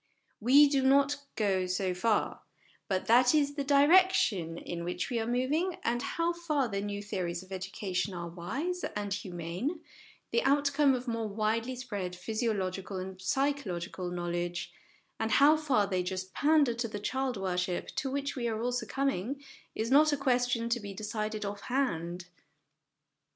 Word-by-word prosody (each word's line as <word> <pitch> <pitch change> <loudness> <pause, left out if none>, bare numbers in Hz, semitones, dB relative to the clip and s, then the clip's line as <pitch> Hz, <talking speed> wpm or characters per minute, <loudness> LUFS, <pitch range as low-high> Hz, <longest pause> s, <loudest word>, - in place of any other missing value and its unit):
We 275 +6 +7
do 280 -1 +2
not 275 +2 +4 0.2
go 190 -4 +1
so 185 0 0
far, 210 +4 0 0.5
but 190 -1 -1
that 245 +5 +5
is 285 -1 +2
the 285 -1 -2
direction 280 - +4
in 170 0 -5
which 180 +7 -3
we 235 - 0
are 225 - -2
moving; 290 +9 0
and 240 +1 0
how 335 +6 -1
far 305 -6 0
the 200 -3 -2
new 205 0 -4
theories 180 -4 -3
of 185 - -18
education 190 0 -3
are 170 -1 -4
wise 260 - -4
and - - -3
8 - - -21
HOME - - -1
EDUCATION 200 0 -3
humane, 175 - -3 0.5
the 475 - +2
outcome 285 - +3
of 250 +1 -5
more 230 -2 -1
widely 220 +4 -1
spread 205 -8 -4
physio 220 +5 -1
logical 190 -1 -3
and 185 0 -6
psychological 190 -9 -1
knowledge, 175 0 -3 0.5
and 225 0 0
how 295 +2 +7
far 280 -9 +2
they 185 -2 0
just 185 +1 -4
pander 295 -4 +3
to 235 0 -2
the 210 - -5
child 260 +3 -1
worship 180 -2 -2
to 270 - -1
which 280 +1 -2
we 240 -3 -2
are 220 -1 -2
all 245 +2 0
succumbing, 265 +1 -2 0.3
is 225 +3 -2
not 305 +3 +6
a 290 - +1
question 245 -3 +1
to 235 +1 +1
be 200 -2 -7
decided 215 0 -3
off 200 0 -5
hand. 180 -10 -2
225 Hz, 170 wpm, -30 LUFS, 185-275 Hz, 0.5 s, We